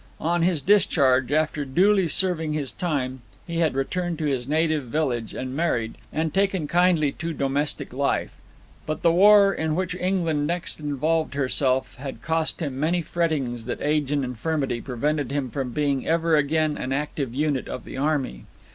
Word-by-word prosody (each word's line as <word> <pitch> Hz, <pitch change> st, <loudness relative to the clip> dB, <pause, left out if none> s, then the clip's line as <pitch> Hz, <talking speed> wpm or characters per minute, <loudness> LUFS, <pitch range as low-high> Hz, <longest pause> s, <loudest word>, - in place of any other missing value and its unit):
On 170 Hz, +2 st, 0 dB
his 170 Hz, -4 st, +1 dB
discharge, 140 Hz, -9 st, +3 dB
after 155 Hz, -1 st, +1 dB
duly 185 Hz, +7 st, +3 dB
serving 160 Hz, -2 st, +1 dB
his 145 Hz, -3 st, -2 dB
time, 135 Hz, -8 st, -2 dB, 0.2 s
he 170 Hz, -1 st, -3 dB
had 160 Hz, -5 st, +1 dB
returned 175 Hz, +5 st, -2 dB
to 155 Hz, -, -2 dB
his 130 Hz, -4 st, -1 dB
native 155 Hz, -1 st, +1 dB
village, 120 Hz, -4 st, -2 dB
and 130 Hz, 0 st, -4 dB
married, 120 Hz, -9 st, 0 dB, 0.2 s
and 160 Hz, -1 st, -1 dB
taken 195 Hz, -5 st, +1 dB
kindly 170 Hz, -3 st, +3 dB
to 165 Hz, +3 st, -5 dB
domestic 140 Hz, -1 st, -2 dB
life. 140 Hz, +2 st, 0 dB, 0.6 s
But 155 Hz, -, -3 dB
the 170 Hz, -, +5 dB
war 200 Hz, +2 st, +6 dB
in 160 Hz, -1 st, -1 dB
which 185 Hz, 0 st, -1 dB
England 175 Hz, -5 st, 0 dB
next 175 Hz, 0 st, -2 dB
involved 155 Hz, +1 st, -1 dB
herself 130 Hz, -1 st, +1 dB
had 135 Hz, +1 st, -7 dB
cost 160 Hz, +1 st, -1 dB
him 135 Hz, -3 st, -4 dB
many 170 Hz, +3 st, +1 dB
frettings 145 Hz, -9 st, -1 dB
that 125 Hz, -, -4 dB
age 150 Hz, -1 st, 0 dB
and 145 Hz, -2 st, +1 dB
infirmity 125 Hz, 0 st, -2 dB
prevented 140 Hz, +3 st, -2 dB
him 140 Hz, -3 st, -2 dB
from 135 Hz, -1 st, -3 dB
being 140 Hz, 0 st, -1 dB
ever 165 Hz, 0 st, +2 dB
again 155 Hz, +1 st, +1 dB
an 130 Hz, -, -4 dB
active 140 Hz, -3 st, -3 dB
unit 145 Hz, -2 st, 0 dB
of -, -, -6 dB
the -, -, -8 dB
army. 140 Hz, -, -1 dB
150 Hz, 170 wpm, -24 LUFS, 135-165 Hz, 0.6 s, war